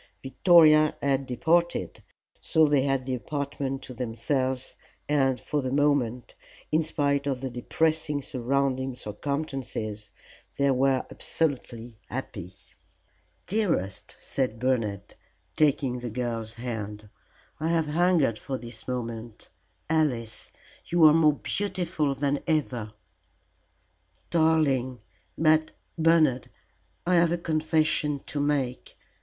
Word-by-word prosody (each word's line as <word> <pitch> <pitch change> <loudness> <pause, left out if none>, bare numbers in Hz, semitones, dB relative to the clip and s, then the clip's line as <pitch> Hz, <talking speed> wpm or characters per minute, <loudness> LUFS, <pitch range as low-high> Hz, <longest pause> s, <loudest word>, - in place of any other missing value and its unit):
Victoria 155 +1 +5
had 135 -1 0
departed, 170 +7 0 0.4
so 160 0 +3
they 145 -2 +3
had 135 -1 0
the 130 - -2
apartment 140 0 -3
to 130 - -8
themselves, 130 +2 -2 0.3
and 135 -3 +2
for 150 - -2
the 130 - -2
moment, 135 -4 +1 0.4
in 155 +1 +3
spite 145 -2 0
of 135 -2 -1
the 130 0 -4
depressing 155 +4 0
surrounding 130 +1 -1
circumstances, 115 -3 -4 0.5
they 140 0 +3
were 130 0 +2
absolutely 120 -7 -3
happy. 100 -8 -6 0.9
"Dearest," 185 - -1
said 125 -5 -2
Bernard, 110 -5 -1 0.4
taking 135 -4 +2
the 120 0 -5
girl's 115 -1 -3
hand, 110 -3 -5 0.5
"I 155 - -1
have 165 -1 +2
hungered 155 -7 +2
for 135 -2 -4
this 115 -2 -10
moment. 115 -3 -5 0.4
Alice, 130 -9 -1 0.4
you 170 -2 +4
are 155 - +8
more 155 -2 +5
beautiful 175 -5 -2
than 140 +1 0
ever." 125 -9 -1 1.4
"Darling! 150 -7 +2 0.4
But, 155 0 +3 0.2
Bernard, 160 -6 +3 0.6
I 180 0 +3
have 170 -1 +4
a 175 - +1
confession 155 -3 +1
to 145 - -3
make. 140 -4 -1
135 Hz, 110 wpm, -27 LUFS, 125-155 Hz, 1.4 s, are